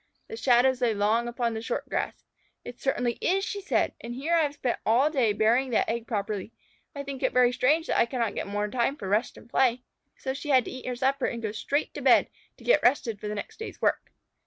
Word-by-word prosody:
The 450 - -5
shadows 255 - +3
lay 235 -3 +2
long 215 +4 +1
upon 240 -1 -1
the 220 - -4
short 230 - -3
grass. - - -3 0.4
"It 245 - -9
certainly 245 -3 0
is," 390 +2 +1
she 405 - -4
said. 390 - 0
"And 240 +1 -6
here 295 +6 -2
I 335 - +5
have 290 -2 -1
spent 250 -4 -2
all 255 +7 +3
day 255 -8 +2
burying 230 +5 +2
that 235 - +1
egg 230 0 -3
properly. 205 -1 -3 0.4
I 280 - -4
think 275 -1 -6
it - - +1
very 250 -1 +4
strange 300 +6 +2
that - - 0
I 235 - +4
cannot 235 -4 -1
get - - -4
more 205 +1 -1
time 245 +5 0
for 200 - -7
rest 210 +5 0
and - - -14
play." 245 0 +2 0.3
So 265 - -3
she 295 +2 -7
had 260 -3 +4
to - - -6
eat 255 0 -8
her 250 - -2
supper 270 +1 +1
and 235 - -4
go 215 - -1
straight 275 +7 -2
to - - -6
bed - - +5 0.3
to - - -16
get - - +4
rested 240 -4 +2
for 210 - -6
the 210 - -3
next 440 - -7
day's 450 - -7
work. - - 0
245 Hz, 245 wpm, -27 LUFS, 225-275 Hz, 0.4 s, I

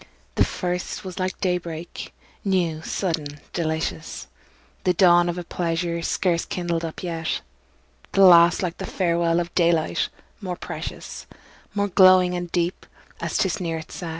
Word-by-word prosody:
The - - +3
first 180 +2 -3
was 185 0 -6
like 185 0 -2
day 180 -2 +1
break, 170 0 -7 0.3
new, 175 -5 0
sudden, 160 -5 -3
delicious, 160 - -3 0.6
The 180 -1 +2
dawn 175 -1 +5
of 175 - -3
a 175 - -4
pleasure 170 0 -2
scarce 170 0 +1
kindled 170 -2 -2
up 165 +2 -6
yet; 165 -2 -2 0.7
The 195 - +5
last 170 0 +7
like 175 -2 -3
the - - -4
farewell 170 -2 +1
of 175 0 -4
daylight, 170 -2 +2 0.3
more 185 -3 -3
precious, - - -7 0.5
More 205 0 +1
glowing 185 -1 +6
and 175 -1 -4
deep, 175 0 -1 0.3
as - - -2
'tis 190 - +1
nearer 165 -3 -2
its 160 - -13
set. 175 -3 -5
175 Hz, 150 wpm, -24 LUFS, 165-180 Hz, 0.7 s, last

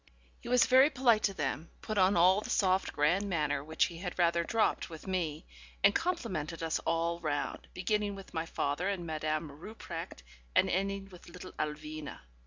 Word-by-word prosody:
He 235 - -9
was 250 0 +5
very 260 +3 +6
polite 250 -6 +3
to 195 - 0
them; 150 +2 -3
put 215 -2 -1
on 185 0 +4
all 185 +4 +5
the - - -8
soft, 190 -1 +2
grand 180 +7 +1
manner, 150 -5 0
which 160 +2 +1
he 170 -1 -7
had 180 -1 -5
rather 170 -1 +3
dropped 220 +2 +1
with 160 -2 -10
me; 170 -5 -2 0.4
and 200 0 +6
complimented 185 - -2
us 160 -1 0
all 170 +1 0
round, 150 -3 -3
beginning 205 +2 0
with 195 -1 -11
my 165 0 -2
father 160 +5 -1
and 190 -4 -3
Madame 155 -1 -2
Rupprecht, 170 - -8 0.3
and - - +4
ending 195 +1 -1
with 180 -1 -13
little 180 +1 -10
Alwina. 155 0 -5
175 Hz, 180 wpm, -32 LUFS, 155-200 Hz, 0.4 s, very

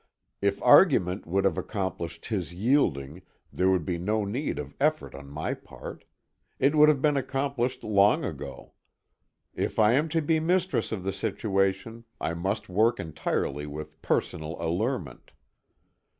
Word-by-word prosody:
If - - +1
argument 90 +1 +5
would 95 +3 +1
have 95 -5 +2
accomplished 85 -5 -4
his 90 -6 -3
yielding 90 - +1 0.3
there 95 +1 +2
would 90 -4 +1
be 85 -2 -2
no 105 +4 0
need 125 +9 -2
of - - -6
effort 155 +2 +1
on 70 0 -10
my 75 +2 -3
part. - - -10 0.5
It 135 +3 +3
would 150 0 +7
have 140 -3 +1
been 150 -2 +3
accomplished 135 -2 -2
long 100 -1 +3
ago. - - -7 0.8
If - - -3
I 110 0 +5
am 150 +5 +2
to 165 +1 +1
be 160 +1 +2
mistress 180 +3 0
of 100 -5 -3
the 95 0 -2
situation 100 +2 -1
I 80 - -2
must 95 +5 -2
work 110 +5 +2
entirely 75 -3 -2
with 75 +1 -8
personal 80 +1 -1
allurement. 85 - -3
100 Hz, 150 wpm, -27 LUFS, 85-130 Hz, 0.8 s, would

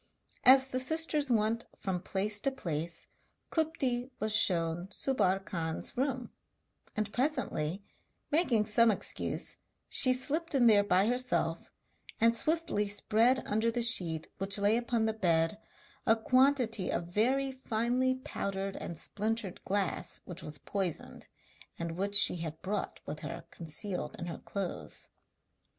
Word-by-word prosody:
As 265 +1 +8
the 255 -1 -3
sisters 305 +1 +1
went 225 0 +1
from 185 -3 -3
place 205 +2 0
to 275 - +1
place, 170 - -4 0.5
Kupti 270 -6 0
was 215 0 0
shown 175 -3 +2
Subbar 195 -6 +1
Khan's 160 -2 -4
room; 255 -1 -2 0.6
and 215 -1 -2
presently, 200 - -1 0.5
making 270 -9 +3
some 225 +2 +4
excuse, 210 - -1 0.3
she 255 - +3
slipped 295 +5 +1
in 250 -3 +4
there 210 -3 +6
by 190 -1 +3
herself 250 +2 0 0.5
and 230 +1 +4
swiftly 310 -8 0
spread 225 +5 +3
under 220 +2 +1
the 235 +1 0
sheet 165 -8 +3
which 195 +2 0
lay 205 +2 +3
upon 235 -1 0
the 220 - +1
bed 170 -1 +1 0.5
a 225 - +6
quantity 250 -4 +2
of 170 - -1
very 265 +6 +2
finely 255 +1 0
powdered 195 -7 -4
and 170 - -6
splintered 215 +1 -2
glass 190 -3 -2
which 180 0 -7
was 150 -1 -4
poisoned, 185 +3 -4 0.5
and 170 0 -4
which 200 +4 -3
she 205 - +6
had 160 -1 -6
brought 205 +2 -3
with 150 +1 -6
her 150 -3 -7
concealed 175 +4 -5
in 175 - -5
her 170 - -6
clothes. 195 -3 -5
215 Hz, 135 wpm, -31 LUFS, 185-255 Hz, 0.6 s, As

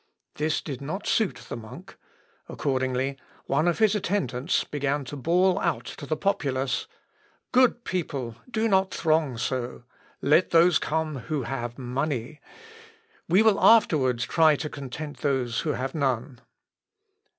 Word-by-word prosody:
This 155 +1 -1
did 140 -4 -6
not 165 +9 -5
suit 185 - 0
the - - -5
monk; 110 -2 -11 0.5
accordingly, 130 0 -1 0.3
one 155 +5 +1
of 175 - +2
his 220 -2 +4
attendants 180 -8 0
began 145 -1 -2
to 125 - -7
bawl 180 +7 +2
out 170 - -1
to 145 - -8
the 155 - -1
populace, 135 -9 -1 0.6
"Good 250 -1 +4
people, 140 - -3
do 225 -2 0
not 190 -2 +2
throng 155 -6 +1
so! 125 0 -3 0.4
Let 150 +6 +3
those 170 0 +5
come 155 -2 -2
who 150 -4 -1
have 120 -1 -4
money. 130 +1 -3 0.9
We 190 +6 +5
will 220 -3 +4
afterwards 140 - +4
try 160 +1 +4
to 150 +1 -5
content 145 +2 -7
those 130 -5 0
who 150 - -1
have 135 +1 -3
none." 130 -3 -2
145 Hz, 140 wpm, -26 LUFS, 130-170 Hz, 0.9 s, those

